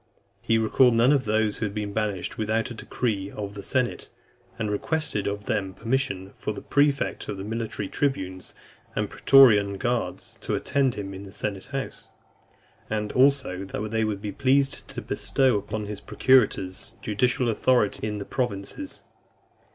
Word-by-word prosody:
He 115 - +2
recalled 115 +2 +4
none 120 +4 +5
of 140 -3 +2
those 110 -1 +1
who 115 - -1
had 100 - -8
been 105 -1 -3
banished, 105 -4 -2
without 110 +3 -1
a - - -4
decree 110 -4 -2
of 100 -1 -6
the 100 - -7
senate: 125 +2 -1 0.5
and 105 -1 -2
requested 110 -1 -1
of 100 0 -3
them 95 -2 -1
permission 115 -6 -1
for 105 - -4
the - - -7
prefect 145 -1 +1
of 100 - -3
the 95 - -5
military 110 -1 -3
tribunes 95 -11 -2 0.4
and - - -1
pretorian 105 -8 +6
guards 120 0 -3
to - - -1
attend 135 -3 +1
him 100 -1 -5
in 95 - -7
the 100 -1 -10
senate 100 -2 -4
house; 135 -1 -5 0.8
and 105 -1 -2
(304) 125 - +5
also 135 -10 +2
that 105 +2 -5
they 110 0 +1
would 105 -2 -2
be 105 - -3
pleased 135 +3 +1
to 130 -3 -7
bestow 110 +5 +1
upon 105 +1 -4
his 105 -1 -6
procurators 105 -8 +2
judicial 125 +3 +1
authority 115 -2 +2
in 105 -1 -3
the 100 - -5
provinces. 125 - -4
110 Hz, 165 wpm, -26 LUFS, 100-130 Hz, 0.8 s, pretorian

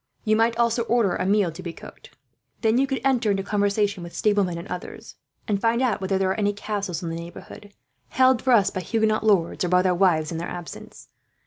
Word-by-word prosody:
You 215 -1 +2
might 230 +1 +2
also 235 0 +2
order 230 -6 +1
a 185 - -2
meal 200 -3 +2
to 160 - -10
be 170 -2 -6
cooked. - - -14 0.4
Then 225 +1 +2
you 275 - +2
could 270 -1 -2
enter 250 -5 +2
into 195 -1 0
conversation 205 -1 0
with 170 0 -9
stablemen 200 -5 +1
and 170 - -8
others, 180 - -8 0.3
and 200 -2 -1
find 230 0 +2
out 245 -7 0
whether 190 0 0
there 190 0 +1
are 190 - -3
any 205 -1 +1
castles 200 -4 -4
in 170 - -3
the - - -4
neighbourhood 170 +4 -10 0.4
held 260 -2 +3
for 260 - +2
us 205 -5 +4
by 190 - -4
Huguenot 220 +2 0
lords, 195 -7 +2
or 180 - -1
by 180 +1 +3
their 185 -1 +2
wives 175 -4 +2
in 165 - -4
their 170 - -5
absence. 175 -1 -9
200 Hz, 225 wpm, -24 LUFS, 180-225 Hz, 0.4 s, us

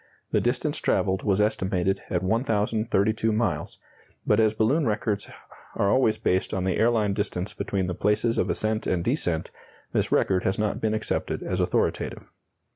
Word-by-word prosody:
The - - +2
distance - - 0
travelled 95 0 +1
was 100 -1 +1
estimated 95 -3 0
at 90 - -1
1,032 110 0 +1
miles, 110 +1 -1 0.5
but - - +3
as 110 -1 +3
balloon 125 +7 +2
records 105 -1 -1 0.5
are 100 - +2
always 130 -4 +3
based 95 +1 0
on 95 - -1
the 95 -1 0
airline 110 -3 +2
distance 100 -1 -3
between 95 -2 -2
the 90 - -2
places 105 +5 +1
of - - 0
ascent 110 0 -1
and 90 -2 0
descent, 90 - -1 0.4
this - - 0
record 95 -1 +2
has 95 - 0
not 105 -1 -1
been 110 -1 +1
accepted 110 - -2
as - - -2
authoritative. - - -1
105 Hz, 160 wpm, -26 LUFS, 95-110 Hz, 0.5 s, but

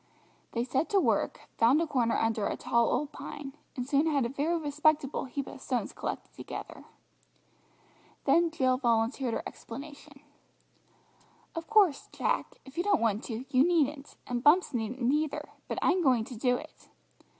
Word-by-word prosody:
They 235 - 0
set 265 - 0
to 405 -2 +4
work, - - +1 0.2
found 240 +6 +5
a 335 - +1
corner 245 -7 +1
under 225 -2 +1
a - - -3
tall 235 -1 +2
old 290 +3 0
pine, 285 -2 -8 0.2
and 250 -2 -4
soon 285 +3 +3
had 285 -5 +2
a - - -1
very 295 +6 0
respectable 300 -2 +1
heap 270 +1 -4
of 265 - -10
stones 250 -2 -2
collected - - -5
together. - - -8 1.4
Then 340 0 +4
Jill 260 -5 +1
volunteered 235 0 +1
her - - -3
explanation. 285 +3 -10 1.3
"Of 330 0 -5
course, 400 -10 +4
Jack, - - -1
if 275 +5 -8
you - - +2
don't 405 -3 +3
want 220 -1 +1
to, 235 +2 -5
you 255 - +7
needn't, 300 -4 +1
and 245 -1 -3
Bumps 325 +3 +5
needn't 240 +2 -3
either, 305 0 -1 0.2
but - - -3
I'm 365 0 +3
going 255 -7 +3
to 250 +2 -8
do 250 +2 +2
it. 310 +3 -13
275 Hz, 165 wpm, -30 LUFS, 245-310 Hz, 1.4 s, you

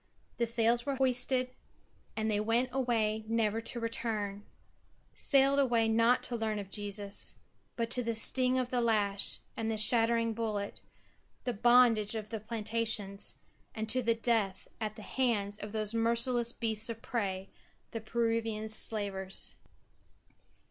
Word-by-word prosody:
The 235 - +1
sails 235 +1 +3
were 280 -1 -2
hoisted 255 -1 +1 0.7
and 220 0 0
they 205 - +1
went 230 +4 +1
away 225 -4 0
never 225 -1 +1
to 235 +1 -3
return; 215 -3 -3 0.7
sailed 275 0 +3
away 235 -4 +3
not 230 +2 +3
to 245 - -3
learn 220 -2 -1
of 200 -1 -6
Jesus, 205 -1 -3 0.4
but 230 -1 -2
to 250 - +3
the 230 -1 -2
sting 255 +3 +3
of 255 -1 -1
the 250 -1 +1
lash 205 -4 +1
and 225 0 -2
the 220 - -1
shattering 230 +1 +5
bullet, 215 -3 -3 0.6
the 245 - -1
bondage 230 -1 +4
of 215 0 -5
the 220 - -3
plantations, 215 -2 -3 0.4
and 220 0 -3
to 255 +3 +3
death 230 -4 0
at 215 -1 -3
the 215 - -10
hands 210 -6 -1
of 210 - -7
those 215 0 -2
merciless 235 +1 +2
beasts 225 -2 0
of 225 -1 -6
prey, 195 -5 -3 0.4
the 225 - -4
Peruvian 225 -1 -1
slavers. 200 -3 -4
225 Hz, 140 wpm, -32 LUFS, 215-235 Hz, 0.7 s, shattering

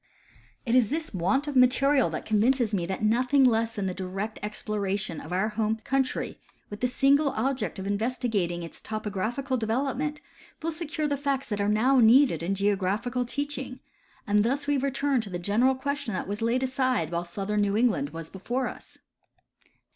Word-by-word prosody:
It 235 - 0
is 245 -4 +4
this 320 0 -2
want 195 - +1
of 290 - -3
material 260 -1 +4
that 155 - -5
convinces 225 +1 +2
me 175 -4 0
that 190 +3 -4
nothing 250 +5 +3
less 230 -2 +2
than 205 -3 -2
the 185 - -1
direct 195 +4 -5
exploration 205 -4 -3
of 160 - -10
our 190 +4 +1
home 215 0 0
country, 270 0 -1 0.3
with 205 - -6
the 250 - +1
single 275 +4 +3
object 255 -1 -1
of 190 - -5
investigating 205 -5 -1
its 165 - -9
topographical 220 +5 -2
development, 270 +6 -1 0.4
will 330 - 0
secure 310 -1 -2
the 285 -1 -1
facts 275 -1 -2
that 205 -2 -1
are 200 - +1
now 250 +6 +4
needed 235 - +5
in 185 +4 -1
geographical 205 +5 0
teaching; 270 -1 -4 0.5
and 205 -1 +3
thus 275 +5 0
we 290 0 +1
return 275 -1 +1
to 215 - -7
the 180 - -3
general 220 +9 +2
question 275 -5 -3
that - - -3
was 205 +2 -4
laid 235 +3 +1
aside 255 - 0
while 170 0 -1
sputhern 195 +4 -2
New 205 -1 +2
Eugiand 210 - +2
was 165 +1 -8
before 240 +7 -2
us. - - -10
230 Hz, 175 wpm, -27 LUFS, 200-265 Hz, 0.5 s, needed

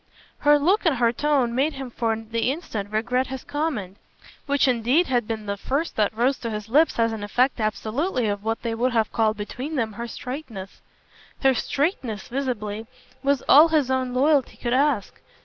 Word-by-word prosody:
Her 295 0 +5
look 365 +9 +2
and 310 - +3
her 235 -2 +3
tone 275 -3 +1
made 280 +5 +1
him 270 -2 -7
for 225 -1 0
the 225 +2 -2
instant 225 - -5
regret 245 +4 0
his 265 0 -6
comment, 255 - -3 0.5
which 285 0 +2
indeed 255 +7 +3
had 245 -6 0
been 220 -2 -4
the 200 0 -3
first 280 +10 -2
that 210 -2 +2
rose 255 +3 +2
to 230 - -4
his 210 0 -5
lips 305 +7 +3
as 230 -1 +2
an 215 -2 -5
effect 250 +5 +1
absolutely 225 - -1
of 205 0 -2
what 225 +1 -2
they 230 -1 -1
would 245 +2 0
have 225 -2 +1
called 220 -2 +1
between 255 +8 -5
them 225 -5 -1
her 235 +3 -5
straightness. 235 -6 -7 0.6
Her 270 0 +5
straightness, 255 - -2
visibly, 225 -5 -3 0.3
was 275 -2 +1
all 300 +4 +8
his 300 -5 +1
own 260 -1 0
loyalty 275 +1 +2
could 240 -1 -2
ask. 270 -6 +1
245 Hz, 185 wpm, -24 LUFS, 220-280 Hz, 0.6 s, all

